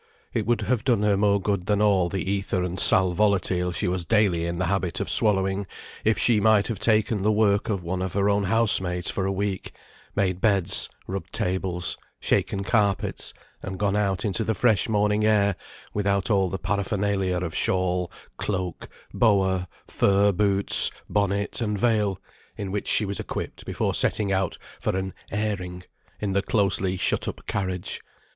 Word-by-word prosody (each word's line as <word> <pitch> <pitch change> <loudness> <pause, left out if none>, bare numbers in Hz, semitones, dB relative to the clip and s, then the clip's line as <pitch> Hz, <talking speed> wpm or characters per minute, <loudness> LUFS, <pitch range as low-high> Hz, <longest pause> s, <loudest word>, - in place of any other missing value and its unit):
It - - -1
would 120 -2 +1
have 115 +2 0
done 120 -5 +2
her 105 -1 +3
more 100 0 +2
good 100 -2 -2
than 105 -1 +2
all 100 -4 +3
the 95 -1 -3
æther 95 -1 -1
and 90 +1 -4
sal 95 -1 +5
volatile 95 -2 +1
she 95 +3 -2
was 90 0 -1
daily 95 -5 +2
in 85 0 -3
the 90 - 0
habit 90 -1 -1
of - - -2
swallowing, 95 -2 +1 0.4
if 110 0 +2
she 115 -3 +3
might 110 -1 +4
have 110 -5 -3
taken 110 -1 +2
the 105 +2 +2
work 105 +1 +2
of 100 -4 -1
one 90 +2 -3
of 95 -1 -3
her 100 0 +1
own 100 0 +2
housemaids 95 -5 +2
for 95 -1 -2
a - - 0
week; 95 0 -3 0.4
made 95 -2 0
beds, 100 -6 +3 0.2
rubbed 95 +1 -6
tables, 90 -1 -2 0.2
shaken 100 - 0
carpets, 100 -2 0 0.3
and 95 0 -6
gone 100 0 0
out 100 -2 0
into 105 +2 0
the 110 0 -1
fresh 110 0 +2
morning 105 0 +2
air, 100 -2 +3 0.4
without 100 0 0
all 95 -2 +2
the 95 - -3
paraphernalia 100 -2 -1
of 85 -3 -3
shawl, 90 -1 0 0.3
cloak, 90 -4 -3 0.2
boa, 95 -5 +2 0.2
fur 100 +1 +3
boots, 100 +1 +4 0.2
bonnet, 100 +2 0
and 105 -2 -1
veil, 105 -4 +1 0.4
in 100 -2 -4
which 105 +1 -3
she 110 - +3
was 100 0 -4
equipped - - -6
before - - -1
setting 105 -2 0
out 95 -2 -1 0.2
for - - -1
an 95 0 -3 0.2
"airing," 95 -4 -3 0.4
in 100 -2 -2
the 100 - +2
closely 95 -2 0
shut - - 0
up - - -6
carriage. 95 -2 -3
100 Hz, 175 wpm, -25 LUFS, 95-105 Hz, 0.4 s, sal